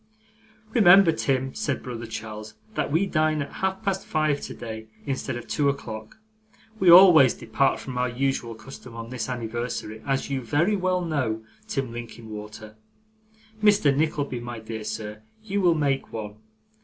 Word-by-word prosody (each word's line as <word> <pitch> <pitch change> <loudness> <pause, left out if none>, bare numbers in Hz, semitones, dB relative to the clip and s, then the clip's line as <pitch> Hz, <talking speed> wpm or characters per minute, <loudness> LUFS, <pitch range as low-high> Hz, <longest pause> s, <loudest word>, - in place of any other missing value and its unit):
'Remember, 195 -5 +7
Tim,' 135 -4 -1
said 220 - -2
brother 120 -3 -6
Charles, 110 -1 -7 0.2
'that - - -2
we 165 +6 +3
dine 155 -4 +1
at - - -11
half 190 0 -2
past 195 -2 -1
five 155 -2 0
today 110 -1 -7 0.2
instead 135 -3 -3
of 120 - -9
two 145 -2 +1
o'clock; 110 - -6 0.6
we 185 - +5
always 170 -7 +9
depart 130 +4 +1
from 125 -2 -5
our 125 0 +1
usual 120 -2 -1
custom 120 +1 -11
on 115 +1 -7
this 125 -2 -4
anniversary, 120 -2 -4
as 135 -1 -1
you 135 -2 -2
very 150 - +1
well 185 -2 0
know, 130 -9 -1 0.2
Tim 135 - -2
Linkinwater. 110 -2 -9 0.8
Mr. 205 -10 +4
Nickleby, 145 -4 -1
my 120 0 -6
dear 110 0 -6
sir, 105 0 -5 0.2
you 200 -1 -1
will 175 -3 +4
make 140 -3 0
one. 105 -2 -6
130 Hz, 155 wpm, -25 LUFS, 115-155 Hz, 0.8 s, always